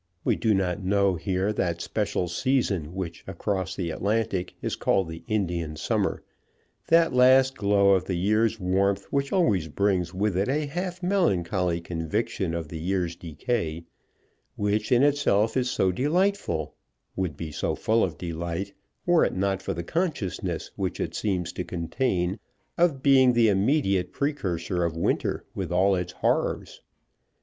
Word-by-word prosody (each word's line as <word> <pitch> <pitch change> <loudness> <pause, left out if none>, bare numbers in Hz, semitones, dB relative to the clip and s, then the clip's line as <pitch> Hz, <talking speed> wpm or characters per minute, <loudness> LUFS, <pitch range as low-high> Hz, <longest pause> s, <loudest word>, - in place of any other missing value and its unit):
We - - +2
do 110 -3 +2
not 95 0 -1
know 100 0 +2
here 95 +4 -1
that 85 -4 -1
special 100 -2 -1
season 95 - 0
which 85 -3 -5
across 95 0 -2
the 85 -3 -3
Atlantic 100 -1 -1
is - - -2
called 95 -3 +1
the 80 0 -8
Indian 85 -7 -1
summer, - - -1 0.6
that 165 -3 +4
last 130 +1 +5
glow 100 -1 +3
of 95 -2 +3
the 95 - -2
year's 110 +5 +1
warmth 95 +1 +1
which 140 0 0
always 105 - +2
brings 90 +1 0
with 100 +1 -1
it 95 +5 +1
a 150 +2 0
half 180 +4 -4
melancholy 90 - +1
conviction 85 +2 -2
of 80 -3 -4
the 80 - -6
year's 90 0 -1
decay, 85 - -3 0.7
which 105 +1 -1
in 125 +1 +5
itself 125 -7 +2
is 125 -1 +1
so 95 -6 +1
delightful, 145 - 0 0.4
would 90 -6 -2
be 80 -2 -5
so - - -2
full 115 +1 +2
of 85 -4 -2
delight, 85 +3 -4 0.3
were 175 -1 +4
it - - 0
not 95 0 0
for 95 - -3
the 85 - -4
consciousness 155 - -2
which - - -3
it - - -2
seems 90 -5 -2
to - - -3
contain 90 +2 -1 0.4
of 165 -6 +2
being 130 -3 +6
the 115 -2 +4
immediate 100 -3 +1
precursor 90 - -1
of 85 -1 -2
winter - - -1
with - - -4
all 95 +3 +3
its 90 -1 -2
horrors. - - -1
95 Hz, 155 wpm, -26 LUFS, 90-120 Hz, 0.7 s, being